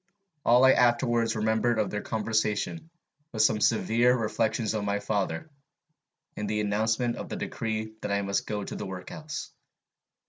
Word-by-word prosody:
All 125 +2 +6
I 130 - +8
afterwards 120 -2 +2
remembered 110 +2 +1
of 105 -2 0
their 105 - -2
conversation 110 +8 -1 0.4
was 110 -2 +3
some 105 - +2
severe 120 +3 +3
reflections 110 0 0
on 110 -2 -2
my 100 0 0
father, 100 - -2 0.8
and 105 -1 -3
the 105 0 0
announcement 110 +3 0
of - - -6
the - - -4
decree 110 -1 -3
that - - -3
I 100 0 +1
must 100 0 -1
go 105 -2 -2
to - - -6
the 105 - -5
workhouse. 95 +12 -7
110 Hz, 160 wpm, -28 LUFS, 105-120 Hz, 0.8 s, I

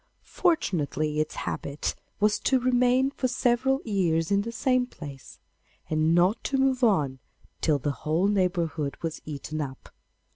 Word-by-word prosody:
Fortunately 155 - 0
its 155 - -1
habit 140 +1 -3 0.3
was 210 0 +3
to 265 - +2
remain 250 +1 +3
for 260 - -1
several 255 +2 +1
years 175 -6 +1
in 200 0 +3
the 230 +3 -5
same 250 +2 +1
place, 140 - -10 0.5
and 155 +1 +3
not 180 +6 +3
to 275 - 0
move 265 -1 +2
on 150 - +2 0.4
till 155 -3 +3
the 140 +2 -1
whole 160 +5 +1
neighbourhood 175 -7 0
was 165 -2 -3
eaten 155 +1 -5
up. 135 -2 -7
185 Hz, 145 wpm, -27 LUFS, 155-250 Hz, 0.5 s, was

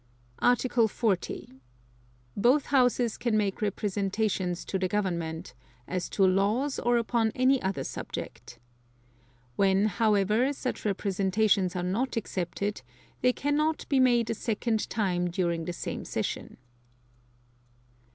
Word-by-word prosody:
Article 245 -1 +3
40. 190 - -2 0.7
Both 250 +7 +3
Houses 245 -3 +3
can 235 -3 +1
make 205 -1 -1
representations 200 -2 -1
to 190 - -2
the 185 - +1
Government, 170 -8 -2 0.3
as 180 -1 -3
to 195 - +3
laws 205 +9 +1
or 240 0 +2
upon 230 -1 +1
any 255 +1 +3
other 190 0 -2
subject. - - -7 1.0
When, 195 +1 +3
however, 215 +4 +2
such 255 -4 -4
representations 195 -1 +1
are 180 - -1
not 230 +8 -1
accepted, 200 -2 -3 0.4
they 250 - +4
cannot 300 +4 0
be 275 - +3
made 240 -3 +3
a - - +1
second 220 0 -1
time 180 -5 0
during 170 -2 -1
the 175 - -3
same - - -5
session. - - -4
210 Hz, 120 wpm, -28 LUFS, 190-240 Hz, 1.0 s, they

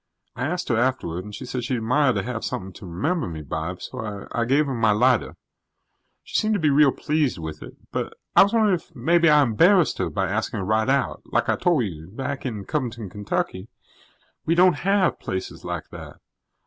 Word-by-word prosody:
I 130 - -2
asked 180 +3 -3
her 120 - +2
afterward 115 -9 -1
and 105 0 -8
she 130 - -7
said 125 0 -4
she'd 125 +1 -1
admire 130 +5 +2
to - - -1
have 120 -2 -4
something 95 0 -4
to 95 - -11
remember 145 - -1
me 80 -3 -6
by, 80 +5 -4
so 105 -1 -7
I 115 - 0
gave 140 +5 +3
her 135 - -3
my 115 -3 +2
lighter. 120 +3 +2 0.9
She - - -1
seem' 215 0 +1
to 210 - +1
be 155 -3 +3
real 140 0 +5
pleased 150 -4 0
with 80 -2 -7
it. - - -10 0.2
But - - -3 0.2
I - - +9
was 200 - +5
wondering 220 -3 +3
if 170 -2 -4
maybe 170 +6 +3
I 150 -1 +6
embarrassed 165 - +4
her - - 0
by - - -1
asking - - -2
her - - -3
right 110 +4 +1
out. 135 0 0
Like - - 0
I - - +3
tol' 170 -8 +2
you, 80 -6 -6
back 135 +6 -4
in 105 -5 -5
Covington, 120 -8 -3
Kentucky, 105 - -3 0.8
we 165 - +1
don't 180 -2 +5
have 195 +1 +1
places 95 0 -5
like - - -5
that. - - -9
125 Hz, 210 wpm, -24 LUFS, 105-155 Hz, 0.9 s, I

